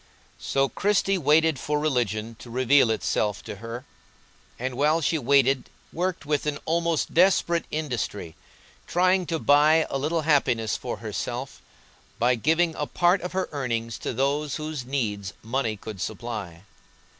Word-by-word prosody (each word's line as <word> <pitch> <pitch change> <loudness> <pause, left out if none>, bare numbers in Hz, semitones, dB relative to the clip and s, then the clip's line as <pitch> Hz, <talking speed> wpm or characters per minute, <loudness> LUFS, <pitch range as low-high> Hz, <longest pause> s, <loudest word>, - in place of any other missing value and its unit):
So 135 0 +1
Christie 195 +2 +1
waited 155 -1 +3
for 150 0 -1
religion 115 -6 -1
to 120 - -11
reveal 130 +1 +4
itself 105 -1 -1
to - - -7
her, 115 +4 -7 0.7
and 130 +1 -3
while 150 +5 +2
she 160 0 0
waited 135 0 +3 0.2
worked 180 -1 -2
with 150 0 0
an 145 -1 -1
almost 170 -1 0
desperate 170 -1 +3
industry, 120 - -3 0.5
trying 185 0 +2
to 165 - -1
buy 155 +2 +4
a 135 - -1
little 160 +4 0
happiness 125 -8 +2
for - - -4
herself - - -5 0.6
by 120 +2 +3
giving 160 +7 +2
a 150 -2 -3
part 175 +2 +2
of 180 - -5
her 190 0 -1
earnings 115 -6 -3
to - - -3
those 140 +3 0
whose 155 -4 -5
needs 105 -7 -2
money 115 -2 -1
could 100 -2 -8
supply. 100 -6 -5
140 Hz, 145 wpm, -25 LUFS, 115-160 Hz, 0.7 s, reveal